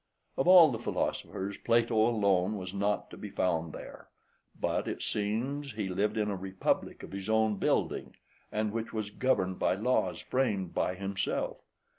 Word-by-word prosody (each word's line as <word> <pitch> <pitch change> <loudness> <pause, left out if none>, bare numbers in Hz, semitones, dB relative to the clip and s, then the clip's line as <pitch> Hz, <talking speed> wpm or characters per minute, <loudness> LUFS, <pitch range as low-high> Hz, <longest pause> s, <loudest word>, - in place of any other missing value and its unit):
Of 135 - 0
all 175 -5 +9
the 115 - -3
philosophers, 100 -3 -2
Plato 115 0 +2
{123d} 110 +2 +4
alone 100 -1 +2
was 95 -1 -6
not 100 +1 -1
to - - -9
be 105 - -7
found 85 -4 0
there, - - -10 0.5
but - - 0
it - - -3
seems 120 +7 -2
he 105 -3 -3
lived 105 +4 0
in 105 -1 +1
a - - -1
republic 95 0 -2
of - - -9
his 95 +1 -5
own 110 -1 +3
building, - - 0 0.4
and 110 0 0
which 115 +1 -4
was 110 -2 -3
governed 95 -6 0
by - - +2
laws 125 +6 +1
framed 105 -9 -1
by 90 - 0
himself. 95 +1 -2
105 Hz, 170 wpm, -30 LUFS, 95-115 Hz, 0.5 s, all